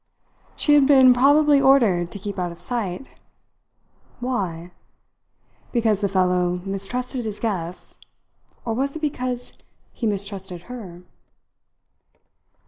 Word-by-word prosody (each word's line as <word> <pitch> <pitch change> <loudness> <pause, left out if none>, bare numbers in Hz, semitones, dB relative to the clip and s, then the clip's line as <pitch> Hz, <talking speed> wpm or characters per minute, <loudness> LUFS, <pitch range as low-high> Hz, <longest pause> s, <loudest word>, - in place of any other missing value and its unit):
She 295 - +2
had 285 -2 +6
been 265 -3 +7
probably 285 +3 +4
ordered 225 -11 +4
to - - -6
keep 200 0 -6
out 175 -1 -2
of 170 - -12
sight. 225 -3 -4 1.1
Why? 185 -9 -3 1.0
Because 220 -4 +1
the 200 - +1
fellow 180 -1 +1
mistrusted 245 +6 -2
his 215 -2 -5
guests; 180 -6 -4 0.7
or 230 - -1
was 275 +5 -1
it - - -4
because 250 -4 -3 0.3
he 230 - -2
mistrusted 195 -3 -3
her? 190 -8 -9
215 Hz, 115 wpm, -23 LUFS, 185-255 Hz, 1.1 s, been